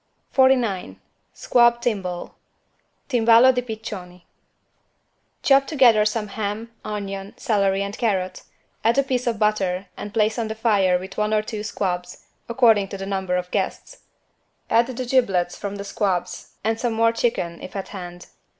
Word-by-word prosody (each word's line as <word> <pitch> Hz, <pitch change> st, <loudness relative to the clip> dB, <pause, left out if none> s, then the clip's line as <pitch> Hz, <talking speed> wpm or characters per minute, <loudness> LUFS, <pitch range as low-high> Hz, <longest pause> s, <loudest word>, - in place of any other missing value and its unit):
49 250 Hz, -8 st, +2 dB, 0.4 s
SQUAB 240 Hz, -1 st, +3 dB
TIMBALE 195 Hz, -7 st, -3 dB, 0.7 s
(Timballo 235 Hz, 0 st, +5 dB
di 250 Hz, -, 0 dB
piccioni) 185 Hz, -6 st, -8 dB, 1.2 s
Chop 275 Hz, 0 st, +4 dB
together 240 Hz, -8 st, +5 dB
some 215 Hz, -1 st, -1 dB
ham, 215 Hz, +2 st, -4 dB
onion, 195 Hz, -1 st, -5 dB
celery 200 Hz, -5 st, +1 dB
and 200 Hz, +1 st, -5 dB
carrot, 185 Hz, -5 st, -1 dB, 0.4 s
add 230 Hz, +3 st, +3 dB
a 275 Hz, -, +4 dB
piece 255 Hz, -2 st, -2 dB
of 230 Hz, -2 st, 0 dB
butter 200 Hz, -3 st, 0 dB
and 205 Hz, -, -7 dB
place 220 Hz, +1 st, +1 dB
on 225 Hz, -, -1 dB
the 220 Hz, -, -4 dB
fire 200 Hz, -5 st, +2 dB
with 190 Hz, +2 st, -9 dB
one 210 Hz, 0 st, +1 dB
or 215 Hz, -, +1 dB
two 215 Hz, -1 st, -5 dB
squabs, 180 Hz, -4 st, -4 dB, 0.2 s
according 230 Hz, -5 st, +4 dB
to 195 Hz, -, -7 dB
the 195 Hz, -, -5 dB
number 190 Hz, -2 st, -2 dB
of 180 Hz, 0 st, -3 dB
guests. -, -, -3 dB, 0.7 s
Add 230 Hz, +1 st, +4 dB
the 255 Hz, 0 st, -4 dB
giblets 195 Hz, -9 st, +1 dB
from 200 Hz, 0 st, -5 dB
the 200 Hz, -, -6 dB
squabs 180 Hz, -3 st, -2 dB
and 225 Hz, +1 st, 0 dB
some 240 Hz, -3 st, -1 dB
more 230 Hz, +1 st, +3 dB
of 230 Hz, -, -4 dB
chicken, 170 Hz, -9 st, -1 dB
if -, -, -9 dB
at 195 Hz, -, -5 dB
hand. 175 Hz, -3 st, -8 dB
210 Hz, 160 wpm, -23 LUFS, 190-235 Hz, 1.2 s, Timballo